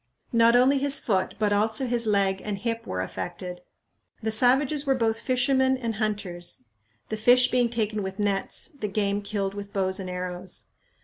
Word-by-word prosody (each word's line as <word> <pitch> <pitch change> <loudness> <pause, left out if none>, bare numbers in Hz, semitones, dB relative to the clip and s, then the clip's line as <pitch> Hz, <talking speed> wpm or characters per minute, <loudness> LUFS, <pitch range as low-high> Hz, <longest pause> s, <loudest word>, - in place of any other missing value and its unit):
Not 230 0 +5
only 265 +3 +4
his 280 0 +2
foot, 190 -4 -1
but 210 -1 +1
also 220 +5 +2
his 235 -2 0
leg 195 -2 +2
and 210 -2 -3
hip 230 +2 -3
were 90 0 -2
affected. 175 - -6 0.6
The 220 - 0
savages 265 +6 +3
were 270 -2 +2
both 225 -2 0
fishermen 260 +1 +2
and 230 -4 -4
hunters; 200 - -1 0.5
the 220 - -3
fish 245 +3 +5
being 245 -2 +2
taken 215 -2 -1
with 190 0 -5
nets, 205 -2 -1
the 280 -10 -5
game 200 0 -1
killed 200 -1 -3
with 200 0 -8
bows 190 -1 -1
and 185 -1 -5
arrows. 180 0 -5
215 Hz, 175 wpm, -26 LUFS, 195-245 Hz, 0.6 s, Not